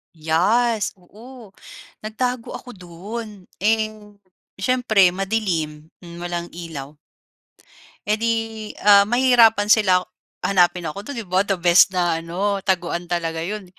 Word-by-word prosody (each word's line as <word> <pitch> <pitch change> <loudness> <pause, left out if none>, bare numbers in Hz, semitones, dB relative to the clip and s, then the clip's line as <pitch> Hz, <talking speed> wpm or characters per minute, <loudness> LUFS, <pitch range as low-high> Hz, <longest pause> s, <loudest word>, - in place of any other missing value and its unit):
Yes, 205 +8 +1
oo 220 +5 -15 0.5
nagtago 235 +3 -4
ako 250 - -10
doon. 195 +5 -8 0.3
Eh, 215 +2 +1 0.6
siyempre 215 -3 +2
madilim, 175 -6 -3
hmm, 170 -1 -12
walang 175 -1 -4
ilaw. 155 -4 -8 1.1
Eh 210 - +2
di 230 +1 +1 0.5
ah 200 -1 +8
mahihirapan 235 -3 +4
sila 190 -5 +5 0.5
hanapin 180 -2 +2
ako 155 +6 -6
do'n, 285 - -5
'di 230 - -5
ba, 185 +1 +2
the 195 -1 -1
best 175 +2 +5
na 175 -3 0
ano 195 +4 -2
taguan 175 -3 -1
talaga 165 -2 -2
'yon. 205 +1 -5
195 Hz, 120 wpm, -21 LUFS, 175-220 Hz, 1.1 s, ah